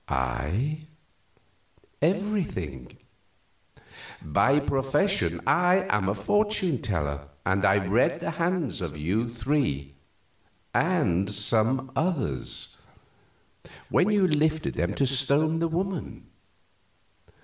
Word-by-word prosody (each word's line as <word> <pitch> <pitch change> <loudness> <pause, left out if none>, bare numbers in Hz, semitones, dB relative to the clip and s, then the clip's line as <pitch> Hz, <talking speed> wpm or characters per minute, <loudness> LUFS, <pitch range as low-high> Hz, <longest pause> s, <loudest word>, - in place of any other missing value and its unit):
"I? 95 - -2 1.1
Everything. 165 - -2 1.3
By 135 - +3
profession 145 +8 0
I 180 +2 +3
am 100 -2 +1
a 100 - 0
fortune 190 - 0
teller, 75 - -2 0.2
and 95 +1 +1
I 95 0 +3
read 105 +7 +2
the - - -3
hands 165 - -1
of 80 -4 -5
you 105 +10 -1
three 115 - -1 0.8
and 105 - +1
some 115 +5 +1
others 145 - -1 1.1
when 185 - +3
you 205 -3 +3
lifted 155 0 +1
them 90 +4 -1
to 140 - +2
stone 140 +5 +2
the 165 - +1
woman. 180 +1 -4
135 Hz, 95 wpm, -26 LUFS, -, 1.3 s, By